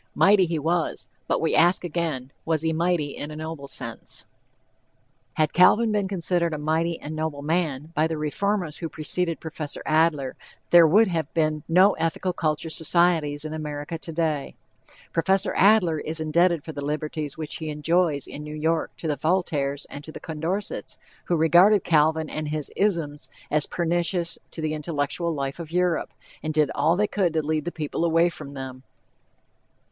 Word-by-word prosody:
"Mighty" 195 -2 +5
he 165 -1 -1
was, 165 +2 -1 0.2
but - - +1
we 160 - 0
ask 175 +3 +4
again, 155 -6 -3
was 160 -1 0
he 160 0 +1
mighty 170 -2 +1
in 145 - -6
a 155 - -8
noble 155 -2 -6
sense? 115 -4 -4 1.1
Had 155 -1 +1
Calvin 215 +6 +5
been 205 -2 0
considered 175 -3 0
a - - -4
"mighty 160 +3 0
and 155 +2 -6
noble 155 -2 -3
man" 155 -2 -1
by 155 0 +2
the 160 -1 -3
reformers 170 +2 -1
who 165 - -4
preceded 165 +2 -1
Prof. 160 0 -8 0.2
Adler, 155 -4 +2 0.4
there 170 -2 +8
would 210 +8 +5
have 160 -5 -2
been 155 -2 +1
no 185 +4 +6
Ethical 165 +3 -1
Culture 160 -1 -1
societies 160 -3 +2
in 155 - -4
America 150 +1 -5
today. 160 -3 -2 0.6
Prof. 190 +3 +2
Adler 190 -6 +4
is 160 +2 -4
indebted 165 +1 +2
for 160 - -5
the 145 -2 -6
liberties 150 0 -3
which 155 -1 -3
he 160 -1 -5
enjoys 155 -1 +1
in 150 - -8
New 150 0 -7
York 160 +1 0
to 165 - -5
the 150 -2 -1
Voltaires 150 -5 0
and 145 - -9
the 155 - -9
Condorcets, 165 +6 -4 0.3
who 175 - +1
regarded 175 +5 +5
Calvin 160 0 +2
and 155 0 -4
his 150 -1 -3
"isms" 165 -8 -1 0.2
as 150 -1 +1
pernicious 175 0 0
to 160 - -7
the 155 0 -1
intellectual 155 +2 -1
life 140 -1 -3
of 165 -2 -7
Europe, 180 -1 +1 0.3
and 155 0 -3
did 150 -2 +3
all 165 - +2
they 205 +3 +2
could 190 -5 0
to 155 -2 0
lead 155 -1 -1
the 175 - -2
people 155 0 -3
away 170 +1 +3
from 140 -4 -9
them. 130 -1 -7
160 Hz, 170 wpm, -25 LUFS, 150-175 Hz, 1.1 s, there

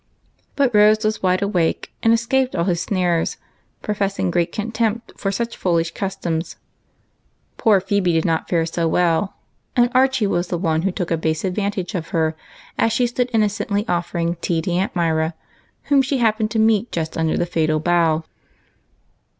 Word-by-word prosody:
But 275 -4 +2
Rose 215 +1 +5
was 215 0 0
wide 185 +1 +2
awake, 180 -5 0
and 225 - +4
escaped 250 +3 +1
all 170 - +1
his 175 -2 0
snares, 175 -4 0 0.5
professing 200 -3 -1
great 170 -1 0
contempt 225 +1 -2
for 195 - -2
such 235 +4 -3
foolish 170 -2 0
customs. 185 -4 -3 1.0
Poor 215 -4 +4
Phebe 190 -1 +1
did 160 0 +1
not 165 -2 0
fare 165 -2 +2
so 165 0 -1
well, 175 +3 +1 0.4
and 240 -1 +3
Archie 260 -2 +3
was 175 -3 0
the 175 - -2
one 160 -2 0
who 195 +2 0
took 180 -1 -4
a 165 - +2
base 160 -1 -1
advantage 200 0 -2
of 170 -4 -3
her 160 -3 0 0.4
as 225 - +3
she 245 +2 +2
stood 245 +1 -1
innocently 210 -1 0
offering 170 -1 -1
tea 170 0 -1
to 180 - -2
Aunt 185 +3 -1
Myra, 160 -1 0 0.5
whom 280 -1 +3
she 270 +1 -1
happened 220 -2 +1
to 225 - -3
meet 220 +1 +2
just 160 -2 -3
under 160 -1 0
the - - +1
fatal 155 -2 0
bough. 165 -1 +2
185 Hz, 170 wpm, -21 LUFS, 170-215 Hz, 1.0 s, Rose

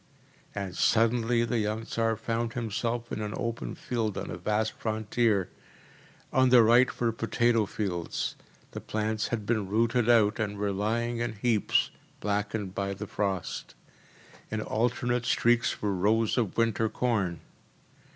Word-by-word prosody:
‚ÄĚ - - -32
and 90 -2 -7
suddenly 115 +1 +3
the 115 0 0
young 110 +1 -2
Tsar 115 -1 0
found 115 +1 -2
himself 115 0 -2
in 110 - -3
an 105 0 -3
open 115 0 -3
field 110 -5 -2
on - - -4
a - - -4
vast 105 +4 0
frontier. 110 -2 0 0.8
On 130 -1 +4
the 125 -2 +7
right 120 +3 +4
were 120 -1 +2
potato 115 0 +1
fields; 90 -6 -3 0.4
the - - -6
plants 110 0 -1
had 110 -3 -3
been 110 -4 0
rooted 115 +3 +2
out, 110 -1 +4
and 105 -2 -2
were 100 0 0
lying 115 +4 -1
in 120 -1 -2
heaps, 110 -1 +1 0.3
blackened 105 -1 -2
by 100 0 -2
the 105 +2 -6
frost; 100 -3 -3 0.7
in 110 - -2
alternate 120 +2 0
streaks 120 -1 +2
were 100 -1 +1
rows 105 +4 +2
of 115 -7 -1
winter 115 -1 +2
corn. 100 -10 -1
110 Hz, 150 wpm, -28 LUFS, 105-120 Hz, 0.8 s, the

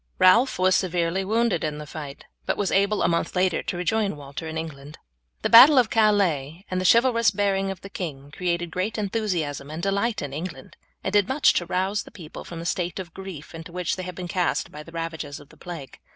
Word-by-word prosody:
Ralph 230 +8 +5
was 185 +1 +3
severely 180 0 0
wounded 220 -2 +1
in 150 -1 -2
the 150 - -7
fight, 145 -2 -8 0.2
but - - 0
was 205 - 0
able 200 +2 +2
a - - +4
month 170 +2 -1
later 180 -1 +2
to 175 - -4
rejoin 200 +1 0
Walter 140 +2 -7
in 160 0 -5
England. 150 -2 -7 0.5
The - - +1
battle 265 +5 +10
of 245 -3 +4
Calais 190 -7 +2
and 185 0 0
the 185 - +4
chivalrous 235 -1 +4
bearing 195 -1 0
of 195 -2 -6
the 195 - -9
king 145 -7 -6
created 175 0 -2
great 190 +7 -2
enthusiasm 185 -10 -2
and 160 +3 -6
delight 200 +2 0
in 140 -1 -5
England, 150 -3 -7 0.3
and 190 - -2
did 205 -2 +4
much 270 +2 +4
to 175 - -1
rouse 190 +3 0
the - - -12
people 165 -6 -10
from 170 - -9
the 165 - -6
state 175 0 -2
of 180 -3 -7
grief 190 -6 -9
into 165 +1 -9
which 180 -1 -2
they 185 - -5
had 180 -1 -6
been 180 0 -5
cast 180 0 -1
by 150 - -8
the 165 - -13
ravages 165 -3 -5
of 145 - -16
the - - -17
plague. 165 -7 -9
180 Hz, 225 wpm, -25 LUFS, 160-200 Hz, 0.5 s, battle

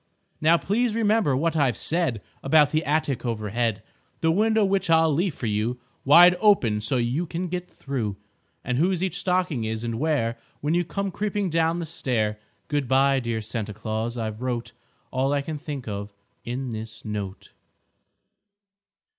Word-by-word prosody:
Now, 160 +2 +5
please 220 +5 0
remember 215 - +2
what 165 +3 0
I've 135 -8 +2
said 155 - 0 0.2
About 145 +1 +4
the 155 +1 +1
attic 150 -3 0
overhead; 115 -1 -1 0.4
The 160 - +3
window 220 +3 +3
which 195 -2 0
I'll 160 -1 +5
leave 170 +1 0
for - - -5
you 110 +3 -1 0.3
Wide 175 +6 +8
open 120 - +3
so 110 +5 0
you 125 +8 0
can 175 +3 -3
get 180 +1 -4
through; 115 -8 -4 0.5
And 125 +1 -1
whose 180 +2 +2
each 190 - -2
stocking 180 -9 0
is, 110 +1 -3
and 115 -1 -3
where, 125 -7 0 0.2
When 150 +2 0
you 175 +1 +2
come 195 +4 -3
creeping 205 -1 -2
down 165 +1 +2
the 170 - -3
stair, 115 -9 -1 0.3
Good 145 -3 -1
by, 135 +1 +4
dear 115 -3 -3
Santa 105 -2 -4
Claus, 110 +2 -3
I've 110 -1 -4
wrote 125 -2 -3 0.4
All 135 +2 +1
I 140 -1 0
can 155 0 -5
think 140 -4 -6
of 100 -1 -5 0.3
in 125 +1 -4
this 110 +1 -7
note. 100 -3 -5
140 Hz, 165 wpm, -25 LUFS, 115-170 Hz, 0.5 s, Wide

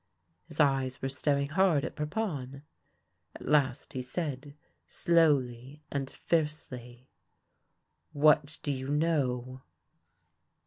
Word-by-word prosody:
His - - -9
eyes 135 -3 +2
were 135 - -2
staring 140 +1 0
hard 165 -3 +3
at - - -6
Parpon. 150 - -3 0.7
At - - -10
last 140 -3 +1
he 130 - -2
said 140 0 -4 0.3
slowly 145 -4 +1
and 135 -1 -2
fiercely: 130 -7 -3 0.5
" - - -49 0.2
What 150 +1 +4
do 145 - 0
you 130 -1 -4
know 130 -5 0
140 Hz, 105 wpm, -30 LUFS, 130-150 Hz, 0.7 s, What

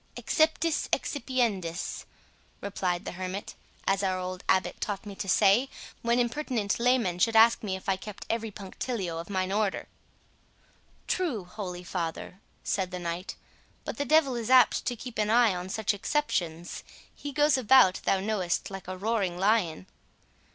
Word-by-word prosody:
"'Exceptis 315 0 +1
excipiendis'" 225 - -1 0.5
replied 185 -3 -2
the - - -4
hermit, 185 +2 -5 0.3
"as 195 0 +2
our 190 -2 0
old 185 0 -5
abbot 190 - +1
taught 205 -1 -3
me 205 - -7
to 195 0 -5
say, 210 +8 +4 0.3
when 235 +1 +2
impertinent 240 -4 0
laymen 235 -8 +2
should 225 +4 +2
ask 225 +1 +6
me 195 -3 -2
if 190 - -10
I 195 -1 +2
kept 205 +1 -9
every 225 -1 -2
punctilio 195 -3 -4
of 170 - -8
mine 190 -1 -1
order." 205 -1 0 1.2
"True, 305 - -1
holy 180 -2 -6
father," 175 +1 -4 0.2
said 190 -2 -1
the 180 - -5
knight; 175 +1 -4 0.5
"but - - -5
the 285 - 0
devil 285 -2 +4
is 235 -1 -3
apt 255 -2 +5
to 245 - -1
keep 240 0 -8
an 210 0 +1
eye 230 -2 +5
on 180 +1 -5
such 215 +1 0
exceptions; 180 - -2 0.3
he 290 - -7
goes 295 +2 +3
about, 255 -6 +5
thou 195 - +2
knowest, 195 -3 -1
like 195 -2 -8
a 185 0 -5
roaring 200 -3 -1
lion." 190 - +1
200 Hz, 160 wpm, -28 LUFS, 185-235 Hz, 1.2 s, ask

